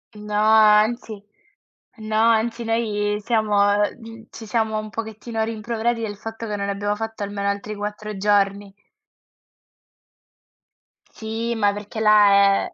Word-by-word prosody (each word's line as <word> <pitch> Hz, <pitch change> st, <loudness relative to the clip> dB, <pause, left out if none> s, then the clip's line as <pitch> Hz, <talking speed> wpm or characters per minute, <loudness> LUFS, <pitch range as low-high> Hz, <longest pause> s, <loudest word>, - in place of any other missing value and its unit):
No, 210 Hz, 0 st, -6 dB
anzi, 215 Hz, +1 st, +3 dB, 0.8 s
no, 215 Hz, 0 st, -4 dB
anzi 230 Hz, +1 st, +2 dB
noi 210 Hz, -2 st, -1 dB
siamo 215 Hz, -2 st, +1 dB, 0.2 s
mhmm, 225 Hz, +2 st, -4 dB
ci 225 Hz, -, -10 dB
siamo 220 Hz, -1 st, -1 dB
un 215 Hz, 0 st, -6 dB
pochettino 220 Hz, +1 st, -4 dB
rimproverati 230 Hz, +1 st, -2 dB
del 210 Hz, -2 st, -4 dB
fatto 225 Hz, +2 st, -7 dB
che 210 Hz, -, -3 dB
non 200 Hz, 0 st, -3 dB
abbiamo 205 Hz, +1 st, -2 dB
fatto 225 Hz, -1 st, -6 dB
almeno 200 Hz, 0 st, -3 dB
altri 205 Hz, +1 st, -4 dB
4 210 Hz, 0 st, -6 dB
giorni. 200 Hz, 0 st, 0 dB, 2.4 s
Sì, 225 Hz, +1 st, -4 dB
ma 205 Hz, -2 st, +2 dB
perché 205 Hz, +2 st, -7 dB
là 210 Hz, -1 st, +6 dB, 0.4 s
è -, -, -10 dB
215 Hz, 125 wpm, -22 LUFS, 205-225 Hz, 2.4 s, là